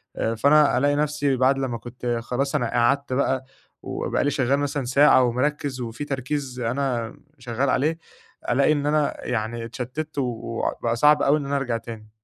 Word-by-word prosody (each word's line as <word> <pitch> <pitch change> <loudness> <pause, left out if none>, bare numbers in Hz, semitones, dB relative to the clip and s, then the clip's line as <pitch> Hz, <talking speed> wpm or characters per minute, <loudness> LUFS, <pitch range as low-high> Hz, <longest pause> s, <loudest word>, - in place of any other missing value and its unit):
آآ، 115 - -1
فأنا 145 +3 +4
ألاقي 145 +2 +2
نفسي، 145 -2 0
بعد 130 +2 +3
لمّا 130 -3 -2
كنت 120 +1 -4
خلاص 135 +4 -2
أنا 120 -6 0
قعدت 130 +3 +1
بقى 130 0 0 0.4
وبقى - - -2
لي 145 - +1
شغَّال 135 +1 +1
مثلًا 145 -1 -2
ساعة 130 +1 +5
ومركِّز، 130 +2 -1
وفي 120 +4 -5
تركيز 135 -1 -3
أنا 120 -1 -2 0.2
شغَّال 125 +3 -1
عليه، 155 +6 +1 0.5
ألاقي 135 +5 +3
إن 145 -2 0
أنا 150 0 0
يعني 115 0 -2
اتشتَّت، 130 +6 -6
وبقى 115 -2 -2
صعب 150 +5 +4
أوي 145 +2 +4
إن 145 - -4
أنا 140 +1 -2
أرجع 125 -4 -1
تاني. 115 -2 -10
130 Hz, 165 wpm, -24 LUFS, 120-145 Hz, 0.5 s, ساعة